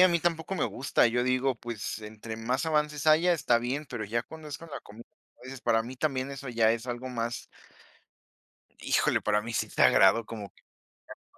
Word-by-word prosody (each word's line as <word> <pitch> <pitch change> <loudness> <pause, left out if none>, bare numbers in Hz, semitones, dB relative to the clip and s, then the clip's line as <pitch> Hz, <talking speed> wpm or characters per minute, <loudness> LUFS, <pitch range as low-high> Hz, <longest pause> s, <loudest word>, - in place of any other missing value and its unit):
a 185 - +8
mí 170 -1 +2
tampoco 170 +2 -1
me 175 - 0
gusta, 130 -1 +2
yo 120 +1 +1
digo, 130 +1 +1
pues, 115 -3 -5
entre 110 +1 -8
más 125 +5 -1
avances 150 -2 0
haya, 165 +3 +5
está 120 -7 +2
bien, 130 +5 -2
pero 115 -3 -4
ya 115 +3 -1
cuando 160 +2 -11
es 145 - -5
con 165 -1 -12
la - - -6
comida, 110 +3 -13 0.4
dices: 130 0 -8
"Para 115 -2 +2
mí 125 +3 -8
también 135 -1 -1
eso 140 -1 -7
ya 115 -2 +3
es 115 +1 -4
algo 125 +1 -4
más" 120 -1 -3 1.4
Híjole, - - +2
para 105 0 +1
mí 115 +2 -6
sí - - 0
es - - -15
sagrado 115 -1 +5
como 105 -3 -7
que - - -27 0.6
ya - - -49
125 Hz, 205 wpm, -29 LUFS, 115-150 Hz, 1.4 s, a